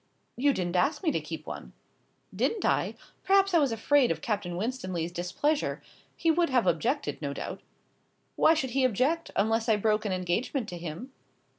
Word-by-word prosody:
"You 285 +3 +3
didn't 180 -7 -2
ask 285 - +1
me 320 - +2
to - - -1
keep - - -7
one." - - -8 0.6
"Didn't 445 - 0
I? - - +1 0.3
Perhaps 390 0 +4
I 340 - +6
was 280 -5 +2
afraid 250 +3 +3
of - - -1
Captain 205 -9 -2
Winstanley's 185 -7 -3
displeasure. 185 - -1 0.4
He 330 - +2
would 340 +1 +2
have 250 -5 +2
objected, 220 - 0
no 140 -2 -3
doubt." - - -6 0.7
"Why 320 - +5
should 265 -5 -2
he 265 +1 +1
object, 260 +8 +1
unless 225 +3 +1
I 220 - +5
broke 210 +1 +1
an 205 - -1
engagement 185 +7 -1
to 175 - -6
him?" 170 - -7
235 Hz, 175 wpm, -28 LUFS, 185-290 Hz, 0.7 s, I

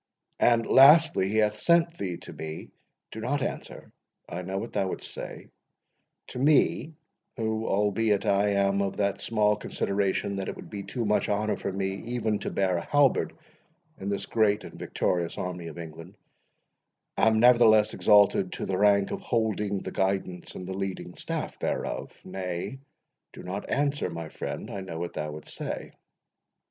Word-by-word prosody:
And 115 -1 +4
lastly, 150 - +6
he 110 - -1
hath 105 -1 +2
sent 170 +5 +3
thee 90 -3 -3
to - - -9
me—Do 80 +7 -10
not 140 +4 -1
answer—I 85 - -8
know 95 +2 -4
what 115 +4 -5
thou 100 -2 0
wouldst - - -6
say,—to - - -12
me, 150 +2 +3 0.4
who, 110 -1 -1
albeit, 105 +1 +1
I 100 +1 +3
am 100 0 +2
of 100 -1 -2
that 100 -1 0
small 105 -2 +2
consideration, 100 -1 -1
that 95 - -3
it - - -5
would - - -11
be 100 -2 -5
too 115 +4 -4
much 105 0 +1
honour 105 0 +1
for 100 - -4
me 95 0 -1
even 110 -1 -2
to - - -3
bear 95 -2 +1
a - - -2
halberd 145 -2 +2 0.7
in 95 - -4
this 100 0 -2
great 105 -1 +2
and - - -10
victorious 85 -2 -2
army 90 -2 -4
of 80 - -9
England, 80 -1 -9 1.0
am 110 0 +3
nevertheless 115 -3 +6
exalted 100 -3 +4
to - - -4
the 95 -1 -1
rank 100 -1 +4
of 195 - -4
holding 105 - -1
the - - -5
guidance 95 -2 -2
and 90 - -6
the 95 - -4
leading 95 0 -4
staff - - -4
thereof.—Nay, 95 +6 -4 0.5
do - - -10
not - - -5
answer, 145 -6 0
my 85 -2 -6
friend—I 100 - -5
know 90 -4 -6
what 85 +1 -4
thou 75 -1 -4
wouldst 75 - -9
say. - - -5
100 Hz, 160 wpm, -27 LUFS, 95-110 Hz, 1.0 s, lastly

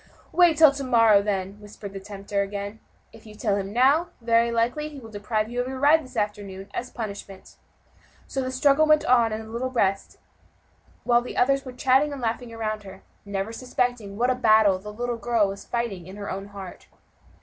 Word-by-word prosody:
"Wait 345 -3 +4
till 310 -2 +8
to 280 0 -5
morrow, 230 -5 +5
then," 200 0 -3
whispered 205 -1 -10
the 195 - -6
tempter 200 0 -4
again; 200 +2 -5 0.3
"if 225 0 -15
you 210 - -12
tell 210 -2 0
him 195 -1 -3
now, 275 +9 +3
very 230 0 +2
likely 240 +7 0
he 290 -2 -10
will 225 -3 -12
deprive 215 +1 -2
you 245 +2 -2
of 250 - -4
your 265 0 -5
ride 305 +3 +5
this 255 -2 -11
afternoon, 205 -2 -3
as 250 - -4
a - - -27
punishment." 200 -3 -8 0.7
So 270 - -3
the 255 - -3
struggle 280 +3 +3
went 305 0 +4
on 235 -3 +4
in 215 +1 -4
the 220 - -11
little 245 +3 -2
breast 195 -6 -1 0.9
while 240 0 +3
others 275 +2 +2
were 255 - -6
chatting 265 +3 +2
and 285 - -6
laughing 235 0 -3
around 215 -2 -3
her, 190 -1 -12 0.2
never 200 +2 -3
suspecting 245 -4 -2
what 245 +3 +2
a - - +3
battle 215 -5 +4
the 210 +2 -8
little 240 +2 -3
girl 230 -3 +1
was 195 0 -7
fighting 235 -6 -3
within 185 +3 -11
her 205 -1 -6
own 195 +1 -5
heart. 195 -3 -10
225 Hz, 205 wpm, -25 LUFS, 200-255 Hz, 0.9 s, till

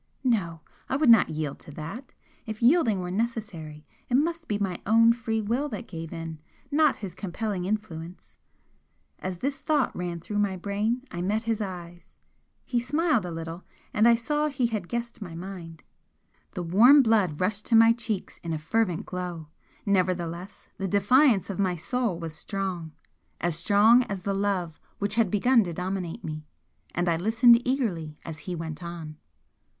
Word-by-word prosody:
No! 185 - 0 0.3
I - - 0
would 280 -3 +5
not 225 - +6
yield 155 -2 -3
to - - -11
that! 165 - -8 0.3
If 220 -1 -5
yielding 240 - +4
were 180 0 -4
necessary, 185 -9 -4 0.2
it 245 - +2
must 330 +4 0
be 205 - 0
my 195 -4 -2
own 230 +2 +6
free 225 -2 -2
will 240 +8 -1
that 230 0 -6
gave 165 -2 -7
in, 165 -2 -6 0.3
not 300 -1 +4
his 185 - -7
compelling 195 0 -3
influence! 185 -4 -5 0.8
As 185 -1 -4
this 275 +9 -3
thought 295 -4 +1
ran 175 -1 -3
through 205 +5 -3
my 200 -2 0
brain 210 +6 -1
I 175 - -4
met 210 +5 0
his 225 -1 -1
eyes, 175 -3 -8 0.5
he 240 - 0
smiled 275 - +1
a - - -5
little, 165 +2 -6 0.3
and 215 +2 +4
I 235 - +7
saw 295 +6 0
he 270 -4 0
had 215 -6 -2
guessed 235 +1 -4
my 175 -5 -7
mind. 170 -3 -8 0.7
The 180 - -3
warm 240 - +7
blood 205 -10 +2
rushed 200 +3 -1
to 230 - +3
my 225 0 +7
cheeks 225 -4 -4
in 165 -1 -4
a - - -1
fervent 175 +3 0
glow, 175 -4 -5 0.4
nevertheless 180 -2 -1
the 195 - -1
defiance 205 +2 +4
of 195 - -6
my 185 -2 +1
soul 225 +2 -1
was 165 -2 -6
strong 185 -3 -4 0.5
as 175 -1 0
strong 210 +7 +5
as 195 -2 -5
the 200 - -1
love 195 -5 -1 0.2
which 205 0 -1
had 225 -3 +2
begun 230 +4 +4
to 175 - -4
dominate 180 -1 -4
me. 155 -1 -6 0.5
And 175 +1 0
I 165 -1 +2
listened 230 +5 +5
eagerly 180 - -1
as 160 -2 -7
he 180 - -2
went 160 -1 -6
on. 170 -3 -7
195 Hz, 175 wpm, -27 LUFS, 170-230 Hz, 0.8 s, I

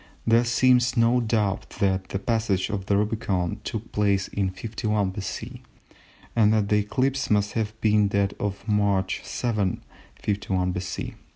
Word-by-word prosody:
There 115 +1 +4
seems 125 +1 +3
no 115 +2 +4
doubt 105 -4 0
that 95 -1 +1
the - - -2
passage 110 -2 0
of 100 -2 -4
the 100 - +3
Rubicon 105 -3 -1
took 110 0 -5
place 100 -2 +1
in 100 -2 -1
51 105 0 -2
B.C., 100 0 -6 0.7
and 110 -2 +5
that 105 -2 +1
the 105 - +4
eclipse 130 +6 0
must 105 -1 +2
have 110 -1 -3
been 105 -1 +4
that 100 0 +1
of 100 0 -4
March 100 -3 +1
7, 105 -7 -1 0.3
51 95 -3 -1
B. 90 0 -4
105 Hz, 150 wpm, -25 LUFS, 100-115 Hz, 0.7 s, and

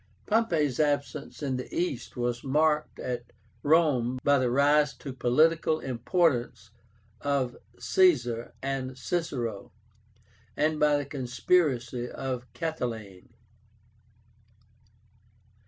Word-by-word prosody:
Pompey's 165 - +1
absence 145 0 -1
in 135 -3 -1
the 125 - -7
East 170 -10 -3
was 120 0 -2
marked 150 +2 +1
at 125 -1 -5 0.3
Rome 145 -6 +3
by 145 -1 +4
the 125 -1 +1
rise 145 +3 +3
to 135 - -7
political 155 +6 +2
importance 125 - 0 0.5
of 140 -3 -1 0.2
CAESAR 125 -12 +2
and 135 -1 -3
CICERO, 130 - -3 0.9
and 155 0 +1
by 150 -1 +4
the 145 - -3
conspiracy 125 -2 0
of 125 -2 -5
CATILINE. 120 - -5
135 Hz, 95 wpm, -28 LUFS, 120-150 Hz, 0.9 s, by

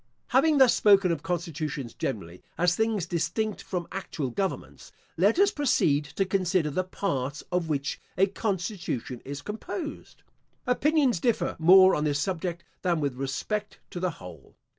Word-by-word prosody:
* - - -47
Having 315 -2 +4
thus 260 -3 +6
spoken 195 -3 +5
of 160 -4 -2
constitutions 155 -7 -3
generally, 90 -4 -5 0.2
as 175 0 +3
things 220 -4 0
distinct 175 +5 -2
from 180 -3 -4
actual 160 -8 -4
governments, 185 0 -4 0.2
let 200 - +3
us 400 +1 +5
proceed 160 - +2
to 195 +6 -2
consider 185 -4 +1
the 185 +6 0
parts 145 -7 -3
of 175 -2 0
which 140 -2 -2 0.2
a 190 - +5
constitution 185 - -3
is 145 +1 -7
composed. 295 - -6 0.4
Opinions 270 - +2
differ 235 +4 0
more 185 +3 +7
on 150 - 0
this 145 -2 +1
subject 170 0 -3 0.2
than 175 -3 +1
with 140 -3 -1
respect 135 - -3
to 175 - -5
the 185 0 0
whole. 85 -6 -12
180 Hz, 155 wpm, -27 LUFS, 145-205 Hz, 0.4 s, more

